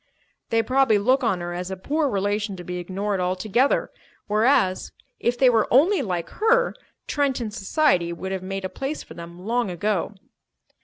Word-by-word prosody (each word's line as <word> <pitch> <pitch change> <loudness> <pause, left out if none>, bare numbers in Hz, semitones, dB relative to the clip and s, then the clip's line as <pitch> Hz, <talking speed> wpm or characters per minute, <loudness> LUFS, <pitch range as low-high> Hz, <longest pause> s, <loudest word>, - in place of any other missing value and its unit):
"They 225 0 +2
probably 260 -4 +3
look 255 +6 +2
on 195 -7 +1
her 175 0 -4
as 180 +1 -4
a 190 - -5
poor 290 +9 0
relation 205 0 -1
to 180 - -9
be 180 0 -5
ignored 195 +3 -2
altogether; 190 +8 +1 0.3
whereas, 210 -3 +2 0.3
if 245 +1 0
they 260 - +5
were 225 -3 +3
only 335 - +4
like 175 -4 -3
her, 475 +3 +3 0.3
Trenton 265 -6 -1
society 200 - +1
would 190 +3 -5
have 190 -1 -3
made 195 +1 -4
a - - 0
place 270 +9 -5
for - - -12
them 170 +2 -10
long 235 -1 0
ago." 200 +2 -1
210 Hz, 170 wpm, -24 LUFS, 185-255 Hz, 0.3 s, they